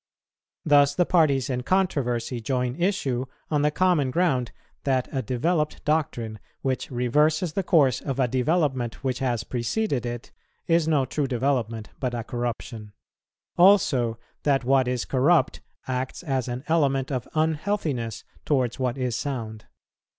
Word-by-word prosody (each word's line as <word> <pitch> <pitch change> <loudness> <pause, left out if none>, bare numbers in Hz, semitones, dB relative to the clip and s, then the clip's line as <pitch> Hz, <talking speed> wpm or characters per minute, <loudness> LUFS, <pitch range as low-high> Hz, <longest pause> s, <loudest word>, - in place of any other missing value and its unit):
Thus 145 -2 +5
the 180 - +3
parties 150 -8 +3
in 125 -2 -2
controversy 125 -8 0
join 125 +1 -1
issue 140 -8 -1 0.2
on 150 -2 +2
the 150 - +3
common 165 -4 +2
ground, 130 -6 +1 0.3
that 130 -2 +1
a 135 - -1
developed 150 +7 -1
doctrine 120 -8 -1 0.2
which 130 -1 -1
reverses 150 +7 +1
the 195 - 0
course 145 -9 +3
of 135 -3 -3
development 130 -3 0
which 130 -1 -1
has 125 -4 -1
preceded 130 - -1
it, 120 0 -6 0.3
is 165 -1 +2
no 150 -4 +2
true 140 +2 -2
development 120 -4 -1
but 125 -2 -2
a 115 - -3
corruption; 115 -3 -5 0.7
also, 135 - +4 0.2
that 140 -3 +2
what 130 0 +3
is 125 -1 -1
corrupt 145 +6 +2 0.3
acts 130 +5 -3
as 135 -6 -1
an 125 +1 -4
element 140 -4 +1
of 125 -3 -3
unhealthiness 155 - -1 0.2
towards 130 -5 0
what 130 0 -1
is 125 -3 -1
sound. 115 -5 -4
130 Hz, 140 wpm, -25 LUFS, 125-150 Hz, 0.7 s, Thus